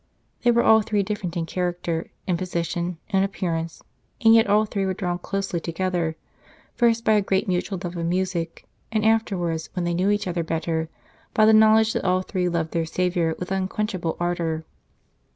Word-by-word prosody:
They 245 - +3
were 235 0 +4
all 220 0 +6
three 210 -1 0
different 190 -4 -4
in 165 - -1
character, 175 -2 -2 0.2
in 180 - +1
position, 175 0 -2
in 195 -2 +2
appearance, 170 -4 -2 0.4
and 225 -1 +6
yet 225 -1 +5
all 210 +2 +4
three 200 -2 -2
were 190 -1 -1
drawn 175 -2 -2
closely 195 -2 -2
together, 170 -1 -2 0.6
first 230 -1 +2
by - - +4
a 210 - +4
great 195 0 0
mutual 185 +1 -1
love 175 0 -4
of 170 - -3
music, 175 -2 -2 0.3
and 215 -1 0
afterwards, 180 -8 0
when 180 -2 -2
they 175 - 0
knew 185 +3 +1
each 205 0 +1
other 175 -1 -1
better, 160 0 -2 0.5
by 215 - +5
the 220 - +6
knowledge 220 0 +5
that - - -2
all 185 0 +2
three 180 -2 -1
loved 165 -2 -1
their 165 -1 -1
Saviour 175 -1 0
with 180 +1 -6
unquench 195 +3 -1
able 170 -3 -3
ardour. 170 -2 -1
180 Hz, 190 wpm, -24 LUFS, 170-205 Hz, 0.6 s, all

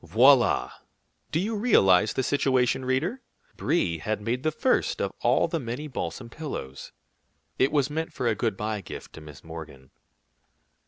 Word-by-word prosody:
Voilà! 120 - +4 0.6
Do 160 - +1
you 215 +5 -1
realize 105 - +4
the 130 - -1
situation, 130 -2 +1
reader? 160 - -1 0.3
Brie 90 - 0
had 110 +8 -2
made 115 +4 -2
the 155 +2 0
first 255 +11 +1
of - - -2
all - - +3
the 165 - -2
many 125 +4 -5
balsam 130 -2 -5
pillows. 115 - -7 0.7
It 130 - +3
was 145 -1 +1
meant 160 +2 -3
for 125 - -4
a 115 - +3
good 110 -2 -1
by 105 0 -3
gift - - -9
to 80 - -10
Miss 75 -2 -12
Morgan. 80 -5 -10
125 Hz, 160 wpm, -26 LUFS, 100-150 Hz, 0.7 s, Voilà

